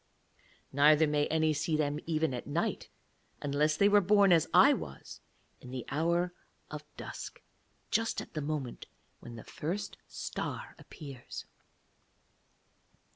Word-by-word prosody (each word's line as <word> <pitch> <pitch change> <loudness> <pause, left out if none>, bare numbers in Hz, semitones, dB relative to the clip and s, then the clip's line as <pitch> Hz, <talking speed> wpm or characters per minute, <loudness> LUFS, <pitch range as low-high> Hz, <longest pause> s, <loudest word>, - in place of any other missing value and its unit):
Neither 150 +3 +6
may 150 -1 +1
any 160 0 +2
see 155 +1 0
them 150 -1 0
even 160 -3 +1
at 120 - -5
night - - -2 0.5
unless 150 +2 +1
they 200 - +5
were 205 0 +6
born, 200 -1 +5
as 165 -2 +4
I - - +7
was, - - -7 0.4
in 125 - -12
the 125 -1 -5
hour 170 +4 +1 0.4
of - - -6
dusk, - - -8 0.5
just 225 0 +1
at - - -9
the 155 - -3
moment 145 -4 -4 0.3
when 120 - -10
the 115 - -9
first 180 +7 -4
star - - -5
appears. 140 -5 -9
155 Hz, 130 wpm, -31 LUFS, 145-170 Hz, 0.5 s, I